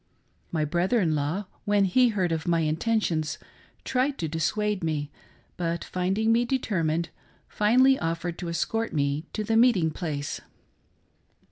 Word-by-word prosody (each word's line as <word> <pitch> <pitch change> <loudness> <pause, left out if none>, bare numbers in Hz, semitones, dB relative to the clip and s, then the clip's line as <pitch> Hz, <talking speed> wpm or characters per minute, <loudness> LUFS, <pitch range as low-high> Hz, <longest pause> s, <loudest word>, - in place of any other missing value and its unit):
My 155 -2 0
brother 175 +9 +1
in 165 -6 +2
law, 155 +7 -1 0.2
when 205 -1 +3
he 250 +7 +4
heard 190 -6 0
of 160 +1 -2
my 170 -1 +2
intentions, 160 -2 0 0.5
tried 265 +2 0
to 165 - -2
dissuade 185 +6 -1
me, 150 -3 -2 0.5
but, 170 -1 -2
finding 195 +5 0
me 235 +1 +4
determined, 170 -10 -1 0.4
finally 255 +6 +4
offered 165 +1 -3
to 175 - -4
escort 225 +7 -1
me 145 +1 0
to 215 - -2
the 225 +2 0
meeting 225 -9 +4
place. 150 -4 -4
175 Hz, 140 wpm, -26 LUFS, 160-220 Hz, 0.5 s, he